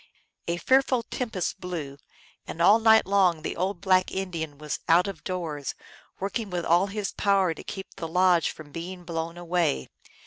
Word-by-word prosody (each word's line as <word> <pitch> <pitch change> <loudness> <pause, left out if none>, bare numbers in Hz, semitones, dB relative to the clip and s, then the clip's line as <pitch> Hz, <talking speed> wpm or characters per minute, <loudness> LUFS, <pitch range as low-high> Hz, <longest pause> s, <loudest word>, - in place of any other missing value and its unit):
A 170 0 0
fearful 260 +4 +3
tempest 220 -6 -3
blew, 155 -7 -5 0.5
and - - -7
all 205 +6 +6
night 220 0 +6
long 185 -5 +2
the - - -3
old 185 0 -2
black 185 -2 +3
Indian 165 -6 -4
was 150 0 -4
out 170 +2 +6
of 195 -4 -7
doors, 165 -6 -4 0.4
working 205 +2 -3
with 175 -2 -3
all 175 +4 +4
his 205 0 -3
power 195 -4 +2
to - - -11
keep 190 -1 -7
the 165 -4 -4
lodge 180 0 +3
from 150 -2 -10
being 175 +3 -7
blown 165 0 -4
away. 175 - 0
180 Hz, 170 wpm, -26 LUFS, 165-195 Hz, 0.5 s, all